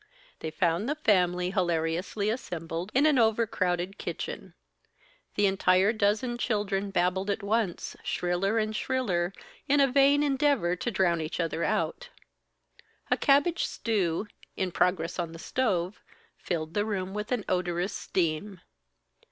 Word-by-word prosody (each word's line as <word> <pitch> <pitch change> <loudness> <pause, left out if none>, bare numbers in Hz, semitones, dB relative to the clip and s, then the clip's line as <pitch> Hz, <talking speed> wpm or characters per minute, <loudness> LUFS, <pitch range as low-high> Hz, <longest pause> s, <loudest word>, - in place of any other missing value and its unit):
They 160 - -4
found 170 - 0
the 300 - 0
family 180 - +2
hilariously 175 +3 0
assembled 175 -5 -4
in 275 +3 +5
an 295 -4 +4
over 225 0 +3
crowded 185 -1 -1
kitchen. - - -5 0.8
The 205 - +3
entire 195 +1 +3
dozen 220 +3 0
children 205 -4 -1
babbled 190 +1 0
at 200 - -1
once, 210 -3 -1
shriller 180 +5 0
and 215 0 0
shriller, 195 -10 0 0.4
in 285 +1 +4
a 275 - +7
vain 280 +2 +4
endeavor 275 - +2
to 210 - -3
drown 185 -6 +1
each 155 +2 -4
other 165 0 -1
out. - - -1 1.0
A - - +6
cabbage 290 +5 +3
stew, 200 -5 -1 0.3
in 185 -1 -1
progress 175 -1 0
on 170 -2 -3
the - - -8
stove, 190 -2 -1 0.3
filled 160 -3 -4
the 205 - +1
room 195 -3 -3
with 210 +3 -4
an 245 -4 -1
odorous 180 +1 -1
steam. 180 +3 -2
195 Hz, 140 wpm, -28 LUFS, 175-225 Hz, 1.0 s, a